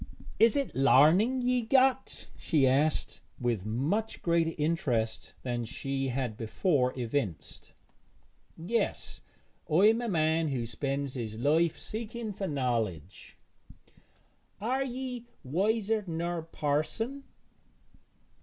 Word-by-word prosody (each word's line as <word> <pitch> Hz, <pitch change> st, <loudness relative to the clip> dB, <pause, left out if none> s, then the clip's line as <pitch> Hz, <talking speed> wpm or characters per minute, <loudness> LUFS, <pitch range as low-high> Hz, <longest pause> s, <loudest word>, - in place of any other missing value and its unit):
'Is't 235 Hz, +5 st, +3 dB
larning 165 Hz, -, +5 dB
ye've 245 Hz, -2 st, +1 dB
got?' 265 Hz, -1 st, +2 dB
she 150 Hz, -6 st, +2 dB
asked, 140 Hz, +4 st, +1 dB, 0.2 s
with 115 Hz, -5 st, -1 dB
much 155 Hz, -, -1 dB
greater 170 Hz, -1 st, +2 dB
interest 130 Hz, -8 st, -1 dB
than 120 Hz, -2 st, -2 dB
she 135 Hz, +4 st, -3 dB
had 125 Hz, -3 st, -2 dB
before 125 Hz, -, +1 dB
evinced. 115 Hz, -, -3 dB, 0.8 s
'Yes; 195 Hz, +9 st, -2 dB, 0.5 s
I 180 Hz, +7 st, +6 dB
am 225 Hz, +2 st, +2 dB
a 240 Hz, -, -2 dB
man 160 Hz, -2 st, +2 dB
who 130 Hz, -5 st, -2 dB
spends 140 Hz, +3 st, -3 dB
his 110 Hz, -4 st, -5 dB
life 155 Hz, +6 st, +2 dB
seeking 225 Hz, 0 st, -5 dB
for 195 Hz, 0 st, -4 dB
knowledge.' 120 Hz, -, -3 dB, 1.2 s
'Are 255 Hz, +6 st, 0 dB
ye 250 Hz, -2 st, -5 dB, 0.2 s
wiser 210 Hz, -, 0 dB
ner 170 Hz, +1 st, -2 dB
parson?' 165 Hz, -, -2 dB
160 Hz, 105 wpm, -30 LUFS, -, 1.2 s, I